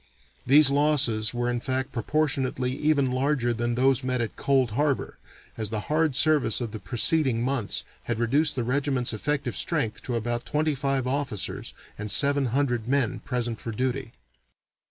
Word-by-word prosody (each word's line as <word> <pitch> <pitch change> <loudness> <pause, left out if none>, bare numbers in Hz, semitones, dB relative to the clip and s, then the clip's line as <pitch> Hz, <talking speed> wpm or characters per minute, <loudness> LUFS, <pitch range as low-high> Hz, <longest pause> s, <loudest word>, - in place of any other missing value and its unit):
These 140 +1 +6
losses 140 -7 +2
were 120 0 -2
in 120 0 -1
fact 130 +1 -3
proportionately 130 0 -1
even 145 -4 +1
larger 130 -2 0
than 120 +1 -2
those 130 +1 +2
met 130 0 -1
with 115 -2 -2
at - - -33
Cold 135 -4 +1
Harbor, 140 +4 -1 0.4
as 110 -2 -2
the 110 -1 -3
hard 155 -3 +2
service 155 -1 +4
of 120 -3 -4
the 110 - -6
preceding 130 0 +1
months 125 -5 -1 0.2
had - - -2
reduced 140 +7 +2
the 125 - -1
regiment's 130 -1 0
effective 140 +2 -2
strength 150 -10 0
to 125 - -4
about 120 +1 -2
twenty 155 +1 0
five 135 -1 -1
officers 130 -6 -3 0.2
and 105 0 -4
seven 140 +4 +4
hundred 120 -2 -1
men 130 -2 0
present 120 -1 -3
for 115 - -5
duty. 130 +2 -3
130 Hz, 165 wpm, -26 LUFS, 120-140 Hz, 0.4 s, These